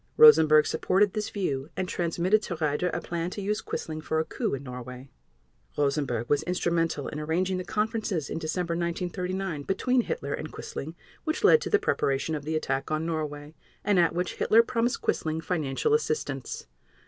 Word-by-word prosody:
Rosenberg 155 0 +8
supported 195 +5 +2
this 215 -1 -2
view, 145 -8 -2
and 185 - -1
transmitted 180 +5 +1
to 180 - -4
Raeder 155 +2 0
a - - -2
plan 170 0 -3
to 200 - -6
use 210 +2 -1
Quisling 155 -1 -5
for 160 - -1
a 160 - 0
coup - - -2
in 135 - -8
Norway. 125 +1 -8 0.7
Rosenberg 140 -5 0
was 145 - +2
instrumental 170 -4 0
in 150 - -5
arranging 180 +5 0
the - - -3
conferences 210 -5 -1
in - - -4
December 170 +2 -2
1939 180 0 -2
between 245 - +1
Hitler 140 -10 -3
and 155 - -5
Quisling 160 +4 -6 0.3
which 315 +1 -2
led 465 - +7
to - - -3
the 420 - +5
preparation 140 - 0
of 145 -2 -4
the 160 +1 -1
attack 135 -3 -1
on 155 +1 -1
Norway, 150 -2 -4 0.3
and 205 -3 +3
at 170 -1 +3
which 180 0 -2
Hitler 225 +2 +5
promised 235 +1 -1
Quisling 160 0 0
financial 160 - 0
assistance. 455 0 -1
165 Hz, 175 wpm, -27 LUFS, 150-190 Hz, 0.7 s, Rosenberg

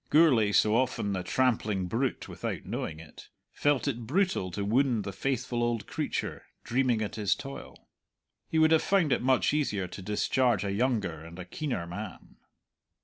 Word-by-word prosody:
Gourlay, 135 -10 +5
so 105 +1 +4
often 120 -5 0
the 95 - -1
trampling 110 -4 +1
brute 120 +8 -1
without - - -5
knowing 80 -1 -4
it, 80 -2 -13 0.2
felt 145 -1 +1
it 120 -4 -3
brutal 180 - +1
to 100 +3 -3
wound 120 0 +2
the 100 0 -5
faithful 125 +2 -1
old 120 -2 0
creature - - -3 0.2
dreaming 125 -3 +1
at 105 - -5
his 105 -2 +2
toil. 135 0 -9 0.6
He 160 - 0
would 160 0 +5
have 160 - +5
found 185 -7 +2
it - - 0
much 130 +2 +3
easier 105 -11 0
to 95 - -8
discharge 115 +5 +1
a 100 - -1
younger 100 - 0
and 85 +1 -11
a 90 - -7
keener 120 - -3
man. 95 +4 -8
115 Hz, 170 wpm, -29 LUFS, 100-135 Hz, 0.6 s, Gourlay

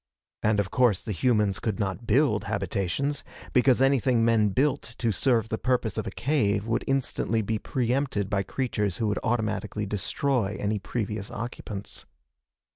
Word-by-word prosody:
And 105 -1 +2
of 100 -1 -1
course 110 -6 +3
the 110 - -4
humans 105 -2 +2
could 110 -2 -2
not 100 +3 -3
build 110 -4 +3
habitations, 100 +10 -1 0.3
because 130 0 +4
anything 130 -3 +3
men 110 -2 +4
built 135 +7 +1 0.2
to 115 -2 +1
serve 115 +1 +2
the 110 - -2
purpose 125 -5 0
of - - -3
a - - -1
cave 105 -4 0
would 115 +1 0
instantly 130 -4 0
be 110 +1 -1
preempted 125 -4 0
by 100 0 0
creatures 105 -3 -1
who 115 - -1
would 105 - 0
automatically 110 -2 -1
destroy 105 +2 0
any 105 +1 0
previous 105 -1 -3
occupants. 105 -4 -6
110 Hz, 155 wpm, -27 LUFS, 100-125 Hz, 0.3 s, because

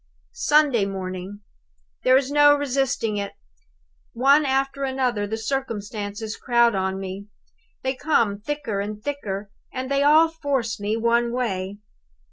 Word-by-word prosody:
"Sunday 295 - +3
morning. 190 +1 -6 0.6
There 255 +1 +5
is 270 0 -1
no 290 0 +6
resisting 270 -6 -1
it! 200 0 -4 0.8
One 275 +4 +4
after 270 +1 0
another 255 -6 0
the 220 +2 -3
circumstances 215 -3 -4
crowd 235 -2 +3
on 190 0 -1
me. 195 +1 -6 0.6
They 260 0 0
come 235 -8 +1
thicker 230 -4 -3
and 205 +1 -4
thicker, 205 -8 -4 0.2
and 260 +1 -5
they 275 0 +2
all 305 +3 +6
force 280 -9 -2
me 210 +2 -1
one 235 +1 +2
way. 200 -6 -2
235 Hz, 130 wpm, -23 LUFS, 205-275 Hz, 0.8 s, no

